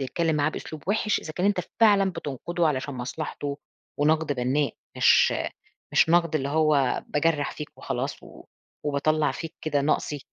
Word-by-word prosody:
بتتكلّم 155 +4 0
معاه 145 0 +2
بأسلوب 155 -1 -7
وِحِش، 210 +1 +1
إذا 155 - -7
كان 180 +4 0
أنت 200 -2 +2 0.2
فعلًا 200 -3 +5
بتنقُده 170 +2 -2
علشان 140 -1 -2
مصلحته 140 +2 -4 0.4
ونَقْد 155 +1 +2
بنّاء 135 +2 0 0.2
مش - - +5 0.6
مش - - +4
نَقْد 170 -1 +3
اللي 135 -2 -2
هو 150 -4 +2
باجرَّح 150 -1 +1
فيك 150 - -9
وخلاص - - -4
و - - -14 0.4
وباطلّع 150 +1 +1
فيك 165 +3 -7
كده 150 -3 +1
نَقصي. 145 0 0
150 Hz, 150 wpm, -26 LUFS, 145-165 Hz, 0.6 s, فعلًا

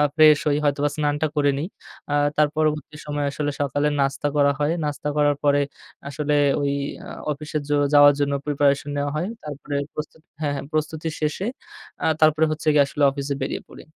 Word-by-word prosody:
Fresh 155 -1 +7
হই, 145 -1 +2
হয়তোবা 145 0 +1
স্নানটা 150 0 0
করে 145 -1 +3
নিই। 155 +5 -2 0.4
আ - - +1 0.2
তার 150 0 +5
পরবর্তী 155 -1 0
সময়ে 145 -1 -2
আসলে 145 0 -2
সকালের 145 +2 0
নাস্তা 135 +1 0
করা 140 -1 +4
হয়। 150 +2 +1
নাস্তা 150 0 -3
করার 145 -1 +3
পরে 145 0 +4 0.5
আসলে 150 +1 -1 0.3
ওই 140 0 +1 0.3
আ - - -9 0.2
অফিসে 150 +1 -4
যো 145 - +3 0.2
যাওয়ার 145 0 +8
জন্য 140 0 +1
প্রিপারেশন 145 -1 +1
নেওয়া 145 0 -1
হয়। 170 +5 -1 0.2
তারপরে 145 -1 -6 0.2
প্রস্তুত 155 +1 -7 0.2
হ্যাঁ, 145 -2 0
হ্যাঁ, 140 - -5
প্রস্তুতি 155 +1 -2
শেষে, 155 +6 -1 0.6
আ - - +1 0.2
তারপরে 155 0 +5
হচ্ছে 155 0 -5
গিয়ে 145 -1 +6
আসলে 145 +1 -2
অফিসে 140 0 -3
বেরিয়ে 135 - -3
পড়ি। - - -12
145 Hz, 180 wpm, -23 LUFS, 145-150 Hz, 0.6 s, যাওয়ার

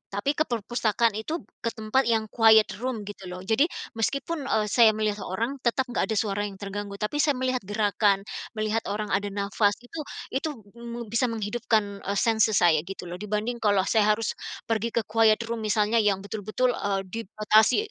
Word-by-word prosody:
Tapi 205 +8 +1
ke 310 +1 0
perpustakaan 230 0 +1
itu, 310 +10 -4 0.2
ke - - -4
tempat 225 +4 +1
yang 220 -2 +1
quiet 220 -2 +6
room, 245 -3 -3
gitu 200 -2 -9
loh. 180 0 -7
Jadi 220 +10 +3 0.3
meskipun, 280 +6 -1
eee, 215 -4 +1
saya 225 -1 +6
melihat 215 -1 -1
seorang, 230 +9 -3
tetap 250 +1 +1
nggak - - 0
ada 220 - -1
suara 205 -1 0
yang 200 - -9
terganggu. 200 0 -5
Tapi 210 +8 -3
saya 290 -2 +3
melihat 255 0 0
gerakan, 205 -1 +1 0.3
melihat 215 +1 0
orang 210 +1 -3
ada 200 +1 +1
nafas. 205 +1 +1
Itu 315 +7 -8 0.3
itu, 270 +4 -1 0.3
mmm, 235 -1 -7
bisa 230 +2 +2
menghidupkan, 215 -2 -1
eee, 200 - -1
senses 220 0 +3
saya, 165 -3 +5
gitu 185 -2 -7
loh. 180 - -5
Dibanding 210 +3 -2
kalau 205 -3 +3
saya 210 +2 +2
harus 225 0 -2 0.4
pergi 225 +1 0
ke 235 - +2
quiet 220 +1 +3
room, 235 - -2
misalnya. 215 +2 +2
Yang 200 -2 0
betul-betul, 220 +4 0
eee, 200 -4 -1
dibatasi, 215 +1 +3
215 Hz, 180 wpm, -26 LUFS, 205-235 Hz, 0.4 s, quiet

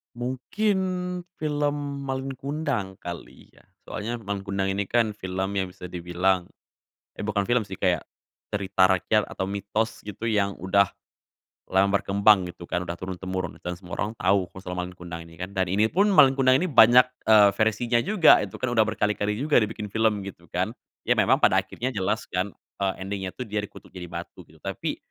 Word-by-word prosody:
Mungkin 130 - -1 0.6
film 145 -1 0 0.3
Malin 135 0 -3
Kundang 135 -8 -3
kali 85 -1 -9
ya, - - -21 0.2
soalnya 115 +3 -4
Malin 100 -2 -4
Kundang 100 -1 -1
ini 95 +1 0
kan 110 +1 +1
film 95 -1 -3
yang 95 -1 -1
bisa 90 - -9
dibilang. 90 +1 -1 0.7
Eh 105 - -4
bukan 105 -1 +1
film 120 +1 +1
sih, 95 - -7
kayak, 90 -5 0 0.4
cerita 95 -2 +2
rakyat 100 +3 +2
atau - - -4
mitos 100 +3 -2
gitu 110 +3 -3
yang 100 -2 +1
udah, 100 +1 +4 0.8
lama 95 +1 +4
berkembang 100 -1 +4
gitu 90 0 -10
kan, 90 - -2
udah 85 -1 -5
turun-temurun 95 -1 -5
dan 90 0 -4
semua 90 -1 -8
orang 105 - -1
tau 95 -1 +2
ku - - -25
soal 90 - -5
Malin 90 0 -4
Kundang 85 -2 -7
ini 85 - -15
kan, 90 +3 -6
dan 95 -3 0
ini 100 +4 +2
pun 195 - +2
Malin 150 -9 +7
Kundang 130 -1 +4
ini 180 - +1
banyak, 125 -4 +7 0.2
eee, 105 -2 +8
versinya 115 +3 +1
juga, 180 - +6
itu 100 -3 -6
kan 130 -1 -2
udah 110 - +5
berkali-kali 105 -1 0
juga 145 0 +3
dibikin 105 0 -3
film, 110 -2 +2
gitu 85 -3 -10
kan, - - -1 0.3
ya - - +4
memang - - +4
pada - - +4
akhirnya 130 +2 -4
jelas 95 -3 -1
kan, 90 +3 -2 0.3
eee, 95 -1 +1
ending-nya 95 -1 -4
tuh 125 - -4
dia 105 0 -2
dikutuk 105 - -11
jadi 90 -2 -8
batu 85 0 -8
gitu. - - -18
Tapi, - - -4
100 Hz, 185 wpm, -25 LUFS, 95-120 Hz, 0.8 s, eee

